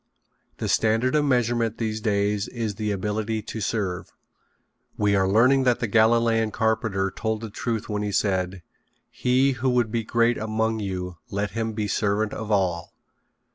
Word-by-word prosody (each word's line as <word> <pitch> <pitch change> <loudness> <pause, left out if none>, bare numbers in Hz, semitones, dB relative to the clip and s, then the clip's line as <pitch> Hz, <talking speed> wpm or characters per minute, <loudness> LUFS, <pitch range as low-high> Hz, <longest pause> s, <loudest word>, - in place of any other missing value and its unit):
The - - -3
standard 115 +3 +2
of 150 -1 +3
measurement 120 -4 +1
these 110 -1 -2
days 100 -1 0
is 115 -4 -3
the 105 +1 -3
ability 105 +2 -2
to 110 - -6
serve. 95 -4 -2 0.9
We 105 -1 +2
are 95 -1 +2
learning 125 +7 +4
that 125 -2 +3
the - - 0
Galilean 115 +1 +3
carpenter 110 -3 0
told 110 -1 -2
the 110 -2 -6
truth 115 -1 -3
when 105 -1 -2
he 105 -1 -2
said: 95 -2 -1 0.5
"He 130 +2 +2
who 130 0 -1
would 120 -3 +1
be 115 -1 -1
great 120 +2 +2
among 110 +1 -1
you 90 -3 -4
let 100 +1 -2
him 115 0 -2
be 105 -1 -2
servant 105 +1 0
of 110 -1 -5
all." 95 -5 0
110 Hz, 165 wpm, -24 LUFS, 100-115 Hz, 0.9 s, learning